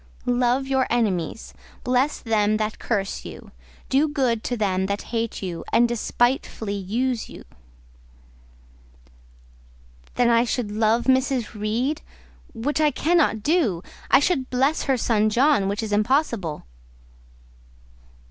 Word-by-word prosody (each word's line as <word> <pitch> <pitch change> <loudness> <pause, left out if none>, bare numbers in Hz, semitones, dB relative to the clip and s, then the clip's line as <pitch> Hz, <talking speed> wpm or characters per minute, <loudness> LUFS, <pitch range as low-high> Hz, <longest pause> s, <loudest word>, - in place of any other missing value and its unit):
"Love 245 +2 +1
your 265 -1 +1
enemies; 215 -5 -1 0.3
bless 255 +4 +1
them 215 -2 +1
that 215 0 -3
curse 200 -4 -2
you; - - -10 0.4
do 280 +4 +2
good 255 -7 0
to 245 - -2
them 190 -3 0
that 200 +1 -3
hate 230 -3 -2
you 175 -3 -4
and 240 - +4
despitefully 240 -2 -1
use 225 +5 -2
you." - - -11 2.7
"Then 245 - +3
I 230 0 +4
should 240 -3 -2
love 220 +2 +2
Mrs. 260 -3 +1
Reed, 235 +8 -2 0.5
which 290 +7 -1
I 305 - +4
cannot 295 -6 +1
do; 260 - +1 0.3
I - - +6
should 285 -3 0
bless 270 +5 +1
her 270 -2 +2
son 215 -2 +2
John, 245 -2 +3
which 205 +3 -2
is 215 - -4
impossible." 210 - 0
235 Hz, 125 wpm, -23 LUFS, 210-265 Hz, 2.7 s, I